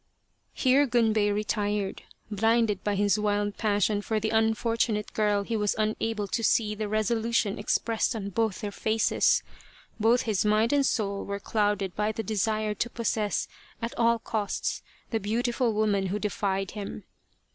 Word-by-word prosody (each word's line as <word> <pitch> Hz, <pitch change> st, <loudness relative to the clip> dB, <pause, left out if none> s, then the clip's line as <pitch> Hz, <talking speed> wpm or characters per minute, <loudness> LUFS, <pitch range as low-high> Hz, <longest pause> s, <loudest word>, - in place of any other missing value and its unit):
Here 275 Hz, +2 st, +4 dB
Gunbei 220 Hz, -4 st, +2 dB
retired. 205 Hz, -1 st, -1 dB, 0.3 s
Blinded 225 Hz, 0 st, +2 dB
by 205 Hz, -1 st, 0 dB
his 205 Hz, +1 st, +2 dB
wild 205 Hz, 0 st, 0 dB
passion 205 Hz, -1 st, +1 dB
for 220 Hz, +1 st, -1 dB
the 220 Hz, +1 st, -1 dB
unfortunate 220 Hz, -1 st, +1 dB
girl 210 Hz, -2 st, +1 dB
he 230 Hz, +3 st, -3 dB
was 210 Hz, -2 st, 0 dB
unable 215 Hz, 0 st, -1 dB
to 230 Hz, -, -1 dB
see 215 Hz, -1 st, +2 dB
the 210 Hz, 0 st, -3 dB
resolution 220 Hz, 0 st, 0 dB
expressed 225 Hz, +3 st, 0 dB
on 200 Hz, -2 st, -4 dB
both 220 Hz, 0 st, -1 dB
their 205 Hz, -, -3 dB
faces. 220 Hz, +2 st, +2 dB, 0.6 s
Both 230 Hz, +3 st, +3 dB
his 215 Hz, -4 st, 0 dB
mind 215 Hz, +4 st, +2 dB
and 285 Hz, -1 st, +3 dB
soul 200 Hz, -2 st, -1 dB
were 200 Hz, 0 st, -4 dB
clouded 205 Hz, -3 st, 0 dB
by 210 Hz, +1 st, 0 dB
the 225 Hz, -, -4 dB
desire 215 Hz, +1 st, 0 dB
to 235 Hz, -, -2 dB
possess 220 Hz, -3 st, -1 dB, 0.3 s
at 230 Hz, +1 st, -4 dB
all 235 Hz, 0 st, +3 dB
costs 220 Hz, -3 st, -2 dB, 0.3 s
the 225 Hz, -, +1 dB
beautiful 235 Hz, +3 st, 0 dB
woman 210 Hz, -2 st, +1 dB
who 195 Hz, +3 st, -1 dB
defied 195 Hz, -2 st, -2 dB
him. 205 Hz, -2 st, -6 dB
215 Hz, 155 wpm, -27 LUFS, 205-225 Hz, 0.6 s, Here